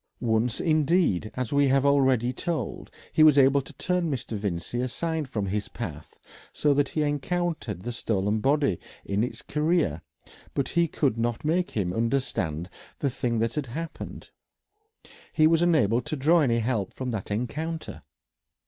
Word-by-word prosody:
Once, 115 0 +1
indeed, 155 - +2
as 125 -1 -3
we 140 0 +4
have 135 +1 +3
already 130 -3 +3
told, 165 +4 -3 0.2
he - - +3
was 155 -2 +7
able 140 +1 +5
to 135 - -12
turn 180 -2 0
Mr. 125 -5 -3
Vincey 100 +3 -3
aside 155 +4 -2
from 105 -6 -2
his 100 +2 -2
path - - -7 0.3
so 145 -1 +2
that 140 -1 +2
he 155 - 0
encountered 145 - -2
the 120 - -3
stolen 105 -2 0
body 140 - +2 0.3
in 100 +2 0
its 125 - -5
career, 150 - +1 0.5
but 140 - 0
he 170 0 +2
could 135 -7 0
not 120 +3 -1
make 175 +4 +1
him 90 -5 -2
understand 115 - -1 0.3
the 140 - -1
thing 120 -2 -1
that 115 +1 0
had 150 -3 -3
happened: 165 +8 -7 1.0
he 155 - +4
was 165 +1 +4
unable 135 -10 +3
to 155 - -4
draw 160 +5 +4
any 120 -5 +2
help 115 -4 -1
from 130 -1 -3
that 110 -4 -4
encounter.... 150 +10 -3
135 Hz, 160 wpm, -26 LUFS, 115-155 Hz, 1.0 s, was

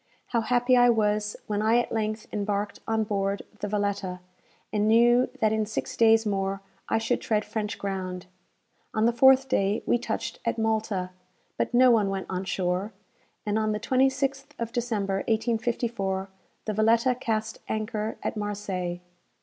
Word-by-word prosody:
How 235 -2 +1
happy 245 +2 +3
I 245 0 +6
was 210 -2 +1
when 210 -1 -1
I 220 +2 +4
at 240 - 0
length 215 -1 -2
embarked 205 0 -2
on 220 0 +1
board 200 -1 -1 0.2
the 205 - -3
"Valetta," 200 -3 -2 0.5
and 210 0 +2
knew 240 +3 +5
that 215 -1 +3
in 215 -1 0
six 215 - -4
days 225 -1 +5
more 195 -1 -1 0.3
I - - +2
should 225 +2 0
tread 215 -2 0
French 210 -1 -3
ground! 185 -2 -4 0.7
On 215 0 +3
the 235 - +3
fourth 265 +2 +6
day, 205 -5 +1
we 240 - +2
touched 230 0 -4
at 230 - -1
Malta, 220 -4 -1 0.4
but - - -1
no 255 0 +7
one 215 -4 +3
went 195 -1 -3
on 185 +1 -2
shore; 185 +2 -1 0.5
and 210 +1 +1
on 215 -1 0
the 210 - -2
26th 270 +3 +1
of 230 -1 -4
December, 220 -5 -1
1854, 225 -4 -1 0.4
the 215 - -1
"Valetta" 230 +4 +3
cast 220 -3 -3
anchor 215 0 -3
at - - -2
Marseilles. 195 -4 -3
215 Hz, 160 wpm, -27 LUFS, 200-230 Hz, 0.7 s, no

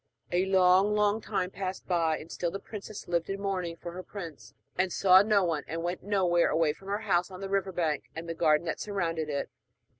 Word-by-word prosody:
A 180 +2 +2
long, 190 +2 +4
long 210 +1 +2
time 190 -4 -2
passed 190 -1 -5
by, 165 -3 +1
and 160 - -11
still 175 - -1
the 195 - -4
princess 210 +1 -8
lived 170 0 0
in 195 0 -3
mourning 185 -4 -2
for 175 - -7
her 180 +2 -6
prince, 175 -5 -9 0.2
and 185 0 +1
saw 185 +1 +6
no 205 -1 +3
one, 160 -4 0
and 165 +1 -4
went 175 +1 -2
nowhere 180 -4 +2
away 160 -2 +2
from 195 +5 -16
her 205 +2 -1
house 180 -2 +2
on 185 -1 -9
the 195 0 -5
river 195 -1 0
bank 160 -4 -1
and 165 +1 -6
the 165 - -2
garden 160 -1 +3
that 165 - -3
surrounded 165 -6 -2
it. 140 -1 -3
180 Hz, 220 wpm, -29 LUFS, 165-195 Hz, 0.2 s, saw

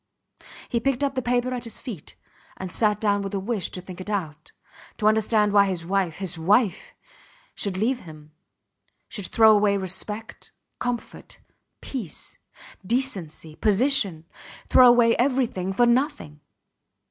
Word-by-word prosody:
He 235 - 0
picked 270 +2 0
up 280 -1 0
the 260 - -1
paper 245 +1 0
at 245 -1 -4
his 230 - -8
feet, 210 - -8 0.4
and 185 -1 -6
sat 210 0 +1
down 205 -2 +1
with 195 0 -5
the 200 - -1
wish 200 -1 -2
to 180 - -7
think 185 0 -9
it 185 - -8
out, 170 -8 -4 0.5
to 210 - -3
understand 215 -1 +3
why 200 -1 +5
his 180 -3 -2
wife 185 -3 0
his 180 -4 -5
wife! 210 - +1 0.6
should 195 -2 -3
leave 240 +6 0
him, 155 -4 -13 0.8
should 200 -5 -4
throw 220 -1 +6
away 205 -1 +3
respect, 205 +4 -5 0.3
comfort, 245 -1 -5 0.4
peace, 235 - -6 0.4
decency, 185 - -3
position 210 - +1 0.4
throw 255 - +7
away 240 -1 +5
everything 245 -8 0
for 240 +5 +3
nothing! 240 - 0
210 Hz, 145 wpm, -24 LUFS, 185-240 Hz, 0.8 s, throw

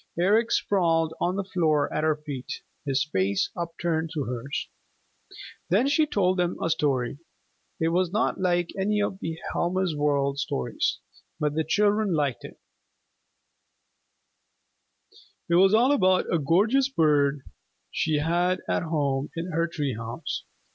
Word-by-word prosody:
Eric 210 +6 +3
sprawled 165 -4 +2
on 180 +1 +1
the 200 - -1
floor 160 -6 +1
at 155 - -1
her 155 -1 +3
feet, 145 -4 -7 0.4
his 135 +1 +2
face 95 +1 +1
upturned 165 -1 -2
to 145 - -1
hers. 125 +2 -4 1.0
Then 210 +9 +3
she 300 +2 +3
told 185 -7 +1
them 175 -1 0
a 165 - 0
story. 140 -4 0 0.6
It 160 - +2
was 180 +1 +1
not 215 +3 0
like 175 -2 +1
any 210 +2 0
of 200 -2 -1 0.3
Helma's 180 -1 0
World 140 -1 +1
Stories, 65 - -1 0.4
but 150 -2 0
the 160 +1 0
children 205 +3 +2
liked 140 -7 -1
it. - - -10 2.9
It 170 - -1
was 190 +3 +6
all 245 +5 +4
about 185 -10 +2
a 170 - +3
gorgeous 215 - +3
bird 145 - +2 0.5
she 155 -2 0
had 175 +4 +1
at - - 0
home 145 -4 -1
in 170 +2 -4
her 165 +1 +1
tree 145 -5 -2
house. 115 +7 -5
165 Hz, 140 wpm, -26 LUFS, 145-185 Hz, 2.9 s, was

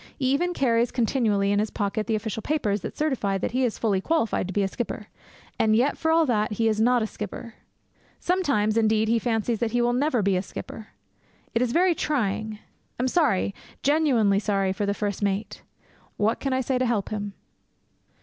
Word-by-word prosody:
He 265 - -2
even 350 +5 0
carries 235 -2 +2
continually 220 -5 +1
in 205 - +2
his 215 +1 0
pocket 210 +1 -2
the 225 - +1
official 220 0 -3
papers 215 -8 0
that - - -7
certify 255 -10 0
that - - -2
he 255 +2 +1
is 240 -4 0
fully 200 -4 +1
qualified 230 - 0
to - - -5
be 200 +1 +1
a - - +1
skipper. 215 0 -5 0.5
And 215 -1 +3
yet, 255 +6 +2
for 320 - -1
all 325 0 +4
that, 215 -5 0
he 225 +2 +1
is 220 -1 +1
not 245 0 +3
a - - 0
skipper. 215 +2 -7 0.7
Sometimes, 275 - +1
indeed, 220 -1 +3
he 230 0 +3
fancies 225 -1 -1
that 235 -1 -1
he 245 - +2
will 240 0 +2
never 255 -3 +1
be 195 -1 +2
a 180 - +1
skipper. 215 +3 -8 0.7
It 230 - +1
is 250 -2 +1
very 355 +5 +4
trying. 220 -8 -1 0.4
I - - 0
am - - +2
sorry 255 - +2 0.3
genuinely 260 -10 +3
sorry 195 -2 0
for 200 +1 -2
the 200 - 0
first 205 -2 -3
mate. 200 +1 -2 0.6
What 215 +2 +1
can 275 - -2
I 260 0 +1
say 260 0 0
to 255 - +1
help 220 -5 0
him? 205 -1 -4
225 Hz, 205 wpm, -25 LUFS, 205-255 Hz, 0.7 s, all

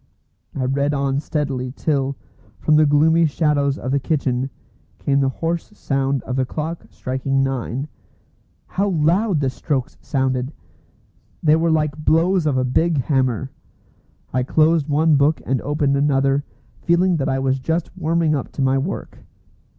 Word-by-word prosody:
I 130 - -1
read 140 +3 0
on 140 0 0
steadily 135 -4 -2
till, 140 -1 -1 0.4
from 155 - +2
the 155 0 +5
gloomy 160 +3 +4
shadows 145 -2 +1
of 130 - -4
the 140 - +2
kitchen, 135 -3 -1 0.5
came 140 -1 +1
the 135 -1 +2
hoarse 165 +6 -3
sound 135 -1 -1
of 130 - -4
the 130 - +2
clock 155 +5 -5
striking 135 +1 -1
nine. 135 +1 -2 0.8
How 200 +2 -1
loud 175 +2 +2
the 135 - +1
strokes 130 -1 -3
sounded! 130 0 -1 0.9
They 155 -1 +5
were 165 +1 +1
like 155 -1 0
blows 165 +2 +3
of 140 -3 +1
a 130 - +2
big 160 +6 +1
hammer. 130 -1 0 0.8
I 130 - +2
closed 155 +3 +2
one 155 +1 +3
book 145 +3 +3
and 130 -1 0
opened 145 -1 0
another, 140 0 +2 0.4
feeling 175 +1 +2
that 135 - -1
I 135 - +1
was 135 0 0
just 160 +7 -2
warming 165 -2 +1
up 140 -4 -3
to - - -4
my 135 0 +2
work. 165 +9 -5
145 Hz, 155 wpm, -21 LUFS, 135-160 Hz, 0.9 s, the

